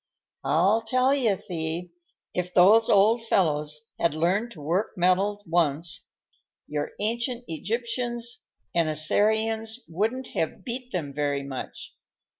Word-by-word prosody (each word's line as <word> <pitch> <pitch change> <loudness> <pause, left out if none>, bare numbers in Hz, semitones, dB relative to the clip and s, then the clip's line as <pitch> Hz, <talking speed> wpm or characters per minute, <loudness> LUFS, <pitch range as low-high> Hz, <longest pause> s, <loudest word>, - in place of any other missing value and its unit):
"I'll 175 +11 +3
tell 255 +4 +2
you, 240 -8 +2
Thee, 170 -1 -4 0.4
if 180 0 -2
those 210 +5 +6
old 220 +4 +4
fellows 150 -6 +1 0.2
had 170 -3 +1
learned 185 +9 +1
to 160 - -13
work 170 +8 -1
metals 195 +3 +2
once, 165 -1 0 0.6
your 150 -1 -3
ancient 235 +3 -1
Egyptians 235 +6 -3 0.3
and 165 -2 +2
Assyrians 220 +8 +1
wouldn't 220 +10 -2
have 160 - -3
beat 250 0 -5
them 155 -7 -3
very 145 -1 -1
much. 135 -2 -7
195 Hz, 120 wpm, -26 LUFS, 160-230 Hz, 0.6 s, those